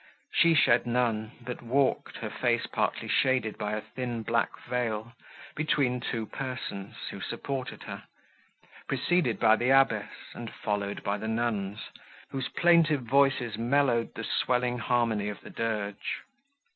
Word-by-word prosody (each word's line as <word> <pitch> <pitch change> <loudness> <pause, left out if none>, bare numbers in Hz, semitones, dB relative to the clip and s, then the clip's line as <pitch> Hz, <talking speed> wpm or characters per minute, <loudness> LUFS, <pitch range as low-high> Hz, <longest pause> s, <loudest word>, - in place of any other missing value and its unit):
She 170 -1 +5
shed 120 -5 +4
none, 115 -2 0
but 125 +1 -6
walked, 130 +3 +1
her - - -5
face - - +1
partly - - -1
shaded 130 -5 +2
by 105 0 -2
a 105 - -1
thin 120 -2 -4
black 115 +1 0
veil, 115 -2 -2 0.4
between 140 -4 +1
two 115 -2 -3
persons, 125 -6 -5 0.2
who - - -8
supported 135 -2 -4
her, - - -7 0.8
preceded 135 -1 +1
by 110 -1 +6
the 120 - +1
abbess, 115 -6 +4 0.2
and 115 -2 -7
followed 100 -1 -3
by 100 +1 0
nuns, 110 -2 -1 0.5
whose 135 -1 -2
plaintive 165 -5 +4
voices 125 -3 +2
mellowed 120 -1 +2
the - - -5
swelling 125 -1 +1
harmony 115 -4 +1
of 105 - -6
the - - -11
dirge. 105 -3 -3
120 Hz, 135 wpm, -29 LUFS, 110-130 Hz, 0.8 s, by